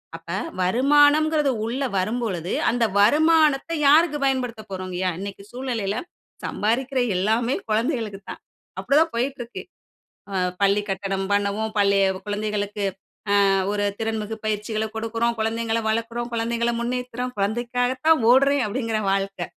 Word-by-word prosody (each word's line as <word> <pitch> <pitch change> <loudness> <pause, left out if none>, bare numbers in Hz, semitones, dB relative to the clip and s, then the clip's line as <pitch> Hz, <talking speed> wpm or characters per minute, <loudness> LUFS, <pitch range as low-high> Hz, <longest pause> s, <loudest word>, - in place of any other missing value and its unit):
அப்ப - - -9 0.3
வருமானங்றது 290 - +4
உள்ளே 260 +4 -2
வரும்பொழுது, 190 -3 -2 0.2
அந்த 240 0 0 0.2
வருமானத்த 305 +5 +4 0.2
யாருக்கு 300 +1 +5
பயன்படுத்தப் 250 -5 -2
போறோம்யா? 185 -1 -2
இன்னைக்கி 200 0 -7
சூழ்நிலையில, 240 -6 -3 0.5
சம்பாரிக்கிற 255 +5 -1 0.2
எல்லாமே 225 +6 +1
குழந்தைகளுக்கு 220 -2 -1
தான். - - -8 0.4
அப்படி 275 - 0
தான் 325 - +1
போய்க்கிட்டு 255 +2 -2
இருக்கு. 235 - -9 1.0
பள்ளி 200 +1 +3
கட்டணம் 195 0 -2
பண்ணவும், 205 +2 0
பள்ளி 200 -1 +3 0.3
குழந்தைகளுக்கு 205 0 -3 0.6
அ - - +3 0.2
ஒரு 205 0 0
திறன்மிகு 220 -1 -3
பயிற்சிகள 215 +1 -1
கொடுக்குறோம், 230 +1 -1
குழந்தைகள 225 +1 0
வளர்க்குறோம், 230 +2 -2
குழந்தைகள 235 +1 0
முன்னேத்துறோம். 250 +1 -3
"குழந்தைக்காக 240 +5 0 0.2
தான் 320 -4 +5
ஓடுறேன்." 275 +2 +4
அப்படிங்கிற 225 0 -2
வாழ்க்கை. 195 0 -2
230 Hz, 115 wpm, -23 LUFS, 205-255 Hz, 1.0 s, யாருக்கு